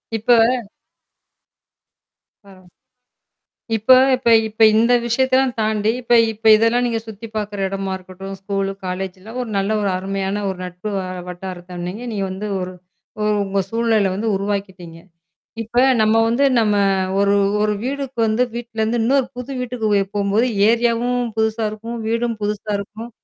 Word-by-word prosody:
இப்ப 225 Hz, +3 st, +3 dB, 2.1 s
அ. -, -, -16 dB, 1.3 s
இப்ப 220 Hz, +4 st, -4 dB, 0.2 s
இப்ப 250 Hz, -2 st, +1 dB, 0.2 s
இப்ப 220 Hz, +1 st, -2 dB
இந்த 235 Hz, +2 st, +4 dB
விஷயத்தை 260 Hz, +2 st, +1 dB
எல்லாம் 265 Hz, -2 st, +2 dB
தாண்டி, 215 Hz, 0 st, +1 dB
இப்ப 240 Hz, 0 st, +1 dB, 0.2 s
இப்ப 220 Hz, +1 st, -8 dB
இதெல்லாம் 230 Hz, +3 st, +2 dB
நீங்கச் 225 Hz, -1 st, -3 dB
சுத்தி 220 Hz, +1 st, -8 dB
பாக்குற 205 Hz, -1 st, -3 dB
இடமா 195 Hz, 0 st, -3 dB
இருக்கட்டும், 190 Hz, +1 st, -9 dB
ஸ்கூல், 195 Hz, 0 st, -2 dB, 0.2 s
காலேஜெல்லாம் 190 Hz, +5 st, -6 dB
ஒரு 235 Hz, -, -6 dB
நல்ல 195 Hz, +2 st, 0 dB
ஒரு 200 Hz, -, 0 dB
அருமையான 195 Hz, +1 st, -3 dB
ஒரு 190 Hz, -1 st, -4 dB
நட்பு 180 Hz, +3 st, -7 dB
வ 190 Hz, -, -1 dB, 0.3 s
வட்டாரத்தை, 180 Hz, 0 st, -8 dB
நீங்க 205 Hz, +7 st, -6 dB
நீங்க 200 Hz, -3 st, -2 dB
வந்து, 195 Hz, +3 st, -5 dB
ஒரு 180 Hz, 0 st, -5 dB, 0.7 s
உங்க 195 Hz, 0 st, -1 dB
சூழலை 225 Hz, -4 st, +1 dB
வந்து 220 Hz, +3 st, -2 dB
உருவாக்கிட்டீங்க. 195 Hz, -4 st, -4 dB, 0.7 s
இப்ப 235 Hz, +3 st, -1 dB, 0.2 s
நம்ம 215 Hz, +1 st, +3 dB
வந்து 240 Hz, +5 st, +1 dB, 0.2 s
நம்ம 210 Hz, -2 st, +2 dB, 0.4 s
ஒரு 200 Hz, 0 st, +3 dB, 0.3 s
ஒரு 210 Hz, 0 st, +1 dB
வீடுக்கு 270 Hz, -2 st, -4 dB
வந்து 220 Hz, +3 st, +2 dB
வீட்டுல 235 Hz, -2 st, -5 dB
இருந்து 230 Hz, +2 st, 0 dB
இன்னொரு 265 Hz, +2 st, +2 dB
புது 250 Hz, +2 st, -6 dB
வீட்டுக்கு 240 Hz, -3 st, -3 dB
வெ 200 Hz, -, +3 dB
போம்போது, 205 Hz, +4 st, +1 dB, 0.2 s
ஏரியாவும் 235 Hz, +1 st, +1 dB, 0.2 s
புதுசா 220 Hz, 0 st, 0 dB
இருக்கும், 230 Hz, +2 st, -7 dB
வீடும் 230 Hz, 0 st, -1 dB
புதுசா 210 Hz, 0 st, -3 dB
இருக்கும். 220 Hz, +4 st, -8 dB
215 Hz, 145 wpm, -20 LUFS, 195-235 Hz, 2.1 s, இந்த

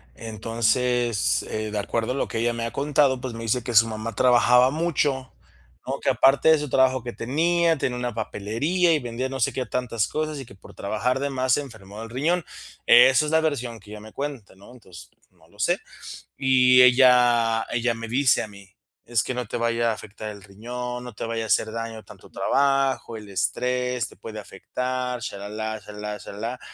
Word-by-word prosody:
entonces, 115 Hz, 0 st, 0 dB
eh, 110 Hz, 0 st, -4 dB
de 105 Hz, -, -3 dB
acuerdo 115 Hz, +4 st, -2 dB
a -, -, -5 dB
lo 140 Hz, -, -1 dB
que 115 Hz, -, -4 dB
ella 120 Hz, +1 st, +1 dB
me 115 Hz, 0 st, -3 dB
ha 115 Hz, -, -4 dB
contado, 140 Hz, -2 st, +2 dB
pues 130 Hz, -2 st, -5 dB
me 115 Hz, -, -7 dB
dice 120 Hz, +3 st, 0 dB
que 120 Hz, -, -4 dB
su 110 Hz, +1 st, +7 dB
mamá 110 Hz, 0 st, -5 dB
trabajaba 125 Hz, 0 st, +5 dB
mucho, 145 Hz, -4 st, -1 dB, 0.5 s
¿no?, 135 Hz, +1 st, -3 dB
que -, -, +1 dB
aparte 135 Hz, +4 st, +4 dB
de 160 Hz, -, +7 dB
su 150 Hz, -1 st, -4 dB
trabajo 130 Hz, -1 st, +3 dB
que 120 Hz, -1 st, -6 dB
tenía, 165 Hz, +6 st, +1 dB
tenía 125 Hz, -2 st, -2 dB
una 120 Hz, -1 st, -3 dB
papelería 130 Hz, -, 0 dB
y 155 Hz, -, +2 dB
vendía 125 Hz, 0 st, -4 dB
no 135 Hz, 0 st, -5 dB
sé 115 Hz, -, +1 dB
qué 130 Hz, -, -2 dB
tantas 115 Hz, -4 st, -1 dB
cosas 155 Hz, -1 st, -3 dB
y 135 Hz, -, -7 dB
que 100 Hz, -, -14 dB
por 95 Hz, -, -16 dB
trabajar 110 Hz, +6 st, -1 dB
de 140 Hz, +1 st, -1 dB
más 130 Hz, -2 st, 0 dB
se 145 Hz, -, +2 dB
enfermó 110 Hz, -7 st, -11 dB
del 115 Hz, -, -8 dB
riñón, 155 Hz, +8 st, 0 dB, 0.4 s
esa 130 Hz, +4 st, +7 dB
es 150 Hz, -, -3 dB
la 160 Hz, -, +4 dB
versión 125 Hz, -7 st, -2 dB
que 105 Hz, 0 st, -15 dB
ella 105 Hz, -, -8 dB
me 110 Hz, +1 st, -13 dB
cuenta, 140 Hz, -9 st, -6 dB
¿no?, 100 Hz, +4 st, -16 dB
entonces 95 Hz, -8 st, -14 dB, 0.2 s
no 85 Hz, -3 st, -26 dB
lo 105 Hz, -, -23 dB
sé. 105 Hz, -, +2 dB, 0.6 s
Y 125 Hz, -1 st, +5 dB
ella 120 Hz, -3 st, +5 dB
ella 120 Hz, 0 st, 0 dB
me 115 Hz, 0 st, -7 dB
dice 130 Hz, +2 st, +3 dB
a -, -, -6 dB
mí: 100 Hz, -1 st, -14 dB, 0.4 s
"Es 115 Hz, -3 st, +1 dB
que -, -, -3 dB
no 125 Hz, 0 st, -3 dB
te -, -, -6 dB
vaya 115 Hz, 0 st, +1 dB
a -, -, -1 dB
afectar 110 Hz, 0 st, -8 dB
el 100 Hz, -, -11 dB
riñón, 125 Hz, +5 st, -6 dB
no 125 Hz, -1 st, -9 dB
te -, -, -7 dB
vaya 115 Hz, 0 st, -3 dB
a -, -, -5 dB
hacer 110 Hz, 0 st, +1 dB
daño 115 Hz, -1 st, -6 dB
tanto -, -, -15 dB
trabajo, 135 Hz, -3 st, +1 dB
el 105 Hz, -2 st, -9 dB
estrés 125 Hz, +3 st, -1 dB
te -, -, -17 dB
puede 110 Hz, -1 st, -8 dB
afectar 125 Hz, +5 st, -4 dB
sha 100 Hz, -, -5 dB
la 100 Hz, -, -7 dB
la, 110 Hz, +1 st, -4 dB
sha 105 Hz, 0 st, -12 dB
la 105 Hz, -, -10 dB
la, -, -, -6 dB
sha -, -, -10 dB
la 100 Hz, -, -10 dB
la", 120 Hz, +3 st, -4 dB
120 Hz, 220 wpm, -24 LUFS, 110-130 Hz, 0.6 s, su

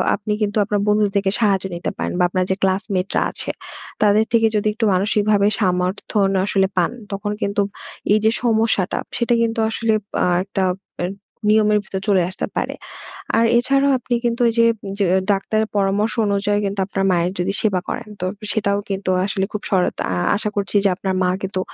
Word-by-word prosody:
আপনি 210 Hz, 0 st, -3 dB
কিন্তু 205 Hz, 0 st, 0 dB
আপনার 205 Hz, 0 st, 0 dB
বন্ধুদের 210 Hz, -1 st, +3 dB
থেকে 195 Hz, -1 st, +1 dB
সাহায্য 195 Hz, -4 st, +2 dB
নিতে 170 Hz, -, -3 dB
পারেন। -, -, -2 dB
বা -, -, +4 dB
আপনার 185 Hz, 0 st, 0 dB
যে -, -, +2 dB
ক্লাসমেটরা 190 Hz, 0 st, 0 dB
আছে -, -, -3 dB, 0.5 s
তাদের 210 Hz, +1 st, +4 dB
থেকে 225 Hz, -1 st, +5 dB
যদি 210 Hz, 0 st, +1 dB
একটু 225 Hz, +1 st, -1 dB
মানসিকভাবে 205 Hz, +1 st, +2 dB
সমর্থন 190 Hz, +2 st, +1 dB
আসলে 195 Hz, -1 st, +2 dB
পান, 175 Hz, +3 st, +2 dB, 0.2 s
তখন 205 Hz, +1 st, -3 dB
কিন্তু 200 Hz, 0 st, 0 dB, 0.5 s
এই 215 Hz, -, +4 dB
যে 220 Hz, -, +5 dB
সমস্যাটা 220 Hz, -5 st, +1 dB, 0.2 s
সেটা 240 Hz, 0 st, +1 dB
কিন্তু 230 Hz, 0 st, 0 dB
আসলে 225 Hz, 0 st, 0 dB, 0.3 s
আহ 175 Hz, -1 st, +2 dB
একটা 195 Hz, -1 st, -2 dB, 0.4 s
এ -, -, +1 dB, 0.4 s
নিয়মের 210 Hz, -1 st, +4 dB
ভিতর 190 Hz, 0 st, -5 dB
চলে 195 Hz, -3 st, +4 dB
আসতে 190 Hz, -, -4 dB
পারে। -, -, -2 dB, 0.6 s
আর 230 Hz, -, +4 dB
এছাড়াও 275 Hz, +3 st, +3 dB
আপনি 245 Hz, 0 st, -2 dB
কিন্তু 235 Hz, +1 st, 0 dB
ঐ -, -, +4 dB
যে 230 Hz, -, +6 dB, 0.3 s
য -, -, 0 dB, 0.3 s
ডাক্তারের 215 Hz, +2 st, 0 dB
পরামর্শ 200 Hz, +2 st, +1 dB
অনুযায়ী 205 Hz, +1 st, +1 dB
কিন্তু 200 Hz, 0 st, -3 dB
আপনার 195 Hz, -1 st, -2 dB
মায়ের 175 Hz, 0 st, +1 dB
যদি 185 Hz, +2 st, 0 dB
সেবা 200 Hz, -4 st, +1 dB
করেন, 235 Hz, -3 st, -5 dB
তো -, -, -1 dB, 0.3 s
সেটাও 200 Hz, -2 st, 0 dB
কিন্তু 195 Hz, -1 st, -2 dB, 0.2 s
আসলে 195 Hz, -1 st, -1 dB
খুব 210 Hz, -, -3 dB
সরত 185 Hz, -2 st, +1 dB, 0.2 s
আ -, -, -1 dB, 0.2 s
আশা 210 Hz, +1 st, -1 dB
করছি 200 Hz, 0 st, -2 dB
যে -, -, +5 dB
আপনার 190 Hz, 0 st, -2 dB
মা 180 Hz, -, +2 dB
কিন্তু 190 Hz, -1 st, -2 dB
205 Hz, 180 wpm, -20 LUFS, 195-215 Hz, 0.6 s, যে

